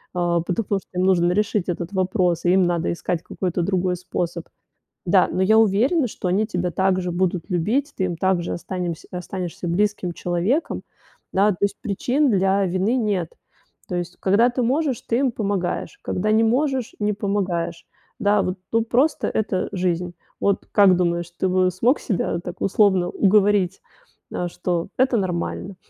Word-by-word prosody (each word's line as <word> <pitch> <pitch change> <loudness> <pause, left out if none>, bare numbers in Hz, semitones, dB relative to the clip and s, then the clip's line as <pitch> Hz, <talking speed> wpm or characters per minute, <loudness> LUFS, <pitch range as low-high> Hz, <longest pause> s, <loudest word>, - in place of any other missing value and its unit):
Э, 175 -1 +1
потому 200 +2 -1
что - - -30
им - - +2
нужно 175 -2 +3
решить 210 -1 0
этот 175 +1 -3
вопрос 185 -3 0
и 175 - +4
им 190 0 +4
надо 175 -1 0
искать 170 0 -3
какой-то 180 -2 -2
другой 185 0 0
способ. 175 -1 -4 0.6
Да, 180 +1 +4
но 185 - 0
я 220 +4 +5
уверена, 240 - +3
что 200 - -6
они 195 +4 +2
тебя 180 -4 -2
так 190 0 +1
же 180 -1 -3
будут 180 -1 -1
любить, 230 - 0
ты 185 - 0
им 175 -2 -3
так 185 0 +1
же - - -4
останем 180 -1 -3 0.2
останешься 180 -1 -5
близким 200 +1 0
человеком, 180 - -1 0.5
да. 200 +2 +4
То 180 - -9
есть, 200 - 0
причин 255 +6 +1
для 195 0 +2
вины 190 +7 0
нет. 205 -8 -1 0.6
То 180 - -2
есть, 175 0 -4
когда 205 +5 +4
ты 245 +1 -1
можешь, 265 +1 0
ты 230 - 0
им 265 -1 +2
помогаешь, 200 -5 -2
когда 215 +4 -1
не 220 +1 +4
можешь, 260 +1 0
не 210 0 +1
помогаешь. 185 -5 -2 0.3
Да, 205 0 +3
вот, 185 +1 -3
ну, 230 0 +3
просто 260 +7 +1
это 210 -3 -1
жизнь. 180 -1 -1 0.3
Вот 200 -1 0
как 195 -3 +6
думаешь, 170 -1 0
ты 190 - +1
бы 185 0 +3
смог 230 - +1
себя 190 -5 -1
так, 175 0 -7
условно, 190 -3 +3
уговорить, 195 -2 +2 0.5
э, 175 - -2
что 175 -1 -2
это 260 -1 +3
нормально? 185 +1 -3
190 Hz, 170 wpm, -22 LUFS, 175-210 Hz, 0.6 s, как